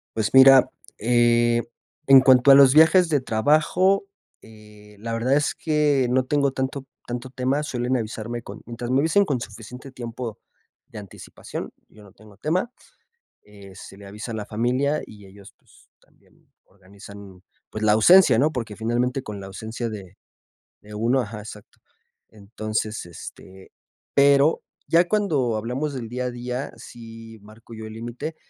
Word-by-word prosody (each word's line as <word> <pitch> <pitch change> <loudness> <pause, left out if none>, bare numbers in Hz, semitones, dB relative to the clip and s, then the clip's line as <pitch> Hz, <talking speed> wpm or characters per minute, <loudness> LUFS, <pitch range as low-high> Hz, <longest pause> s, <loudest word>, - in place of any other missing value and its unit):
Pues, 110 +2 -2
mira, 130 0 +7 0.3
eh, 120 0 +2 0.5
en 135 -1 +8
cuanto 130 +1 +5
a - - +9
los 135 -1 +7
viajes 165 +3 +5
de 145 -4 +1
trabajo, 155 - +1 0.4
eh, 105 -1 -17
la 115 +1 -5
verdad 125 +4 +1
es 145 0 0
que 150 -5 0
no 130 +1 +1
tengo 140 0 +1
tanto 130 +1 -4 0.2
tanto 125 +1 -6
tema, 135 +3 -1
suelen 125 -2 -2
avisarme 115 +1 -6
con - - -11
mientras 120 +1 -6
me 135 - +3
avisen 180 +7 +2
con 140 -8 -2
suficiente 125 +5 -10
tiempo 120 -2 -7 0.5
de - - -10
anticipación, 100 -3 -9 0.2
yo 105 - -18
no 100 - -17
tengo 105 -1 -19
tema. 180 - -2 0.7
Eh, 100 -2 -15
se 95 - -12
le 100 0 -13
avisa 105 +4 -8
a - - -6
la 105 -1 -5
familia 125 +7 -1
y 105 -2 -15
ellos, 100 +1 -16
pues, - - -25
también - - -31
organizan, 100 0 -15 0.3
pues, 110 - -7
la 105 -1 +3
ausencia, 135 - +6
¿no?, 150 +4 +2
porque, 115 -5 -5
finalmente, 120 +4 -1
con 105 -4 -8
la 95 - -9
ausencia 110 +4 -6
de 100 -3 -10 0.7
de 105 0 -14
uno 120 +5 +1
ajá, 105 -1 -7
exacto. 105 -1 -13 0.5
Entonces, 110 0 -5
este, 95 +3 -13 0.4
pero 140 +2 +3 0.2
ya 170 +1 +3
cuando 145 - 0
hablamos 130 +7 -4
del 120 -4 -6
día 125 +1 -4
a 125 - -3
día, 125 +3 -5
sí 115 -1 -12
marco 110 +2 -16
yo 110 0 -8
el 110 - -10
límite. 120 +8 -7
120 Hz, 160 wpm, -23 LUFS, 110-135 Hz, 0.7 s, a